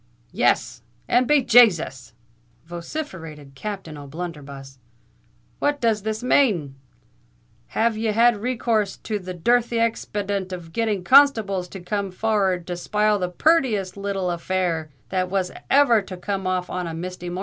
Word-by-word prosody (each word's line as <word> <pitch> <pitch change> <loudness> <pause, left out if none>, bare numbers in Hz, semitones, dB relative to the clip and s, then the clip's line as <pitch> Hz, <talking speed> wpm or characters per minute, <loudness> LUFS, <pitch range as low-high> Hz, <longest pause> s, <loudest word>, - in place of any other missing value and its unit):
"Yes—and 245 +1 0
be 295 -3 +4
Jasus!" 185 - +4 0.5
vociferated 170 - -7
Captain 170 -1 -6
O'Blunderbuss: 140 -3 -8 0.8
"what 290 0 0
does 225 -3 +1
this 220 +3 -3
mane? 205 - +2 1.0
Have 225 0 +2
ye 220 +1 -3
had 230 +1 +4
recourse 225 -3 -1
to 215 -2 -4
the 185 -1 -7
dirthy 235 +6 +1
expadient 205 -4 -2
of 170 -3 -8
getting 215 -5 -1
constables 220 -8 +4
to 190 0 -9
come 200 +2 -2
for 200 +5 -3 0.2
ar 190 - +2
rd 175 -2 -6
to 175 0 -4
spile 210 +3 +1
the 180 -1 -1
purtiest 215 - +1
little 195 -2 -2
affair 170 -2 -2 0.2
that 185 -1 -1
was 185 -1 -1 0.2
ever 265 -6 +5
to 190 -2 -9
come 190 0 -3
off 185 -1 -1
on 180 -1 -3
a 165 - -5
misty 180 +1 -6
mornin'?" 180 +1 -4
195 Hz, 145 wpm, -23 LUFS, 175-225 Hz, 1.0 s, ever